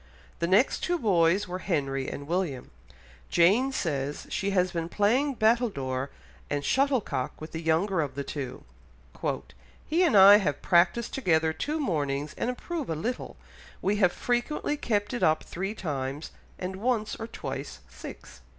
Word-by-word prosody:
The 170 - 0
next 205 +9 +3
two 350 0 0
boys 190 - +3
were 180 +1 -4
Henry 135 -8 -1
and 140 - -6
William; 165 -5 -2 0.6
Jane 210 +11 +4
says, 145 - -2
she 195 - -1
has 185 -2 +2
been 165 -1 -3
playing 250 +9 +2
battledore 195 - +1 0.4
and 145 -1 -2
shuttlecock 255 - 0
with 155 - -8
the 160 - -5
younger 165 +3 +1
of 140 -3 -4
the 140 - -3
two, 135 -2 -6 1.2
"he 330 +3 +1
and 335 - +4
I 200 +1 +10
have 145 -9 -1
practised 180 +7 +3
together 160 -10 +2
two 300 - -2
mornings, 145 - -1
and 235 - -2
improve 305 +4 -4
a 160 - -1
little; 235 +11 -4 0.4
we 205 +2 0
have 180 -4 +4
frequently 245 +8 -1
kept 215 -6 -1
it 240 - -3
up 155 0 +3
three 195 +4 -4
times, 145 -4 -4 0.3
and 190 +1 -5
once 220 0 0
or 225 - -5
twice - - -6
six." - - -11
185 Hz, 155 wpm, -28 LUFS, 155-230 Hz, 1.2 s, I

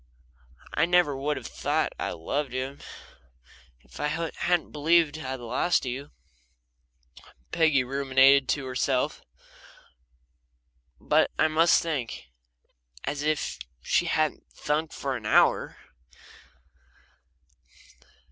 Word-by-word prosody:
"I 165 - +2
never 175 -5 +3
would 145 +2 -2
have 125 - -8
thought - - -1
I - - -2
loved 135 - -3
him 130 +2 -4 1.0
if - - -15
I 150 - 0 0.3
hadn't 175 -2 0
believed 155 0 +2
I'd 130 -3 -5
lost 125 +8 0
you," 130 +3 -5 1.4
Peggy 155 -5 +3
ruminated 135 +1 +4
to 140 -2 0
herself. 130 0 -1 1.8
"But - - +2
I 160 - +4
must 165 +2 +4
think 130 - -4 0.4
" - - -27
As 145 0 -5
if 155 0 -1 0.2
she - - +1
hadn't 155 -1 -1
thunk 155 +2 -2
for 135 -1 -3
an 110 -3 -6
hour! - - +3
140 Hz, 105 wpm, -27 LUFS, 130-155 Hz, 1.8 s, ruminated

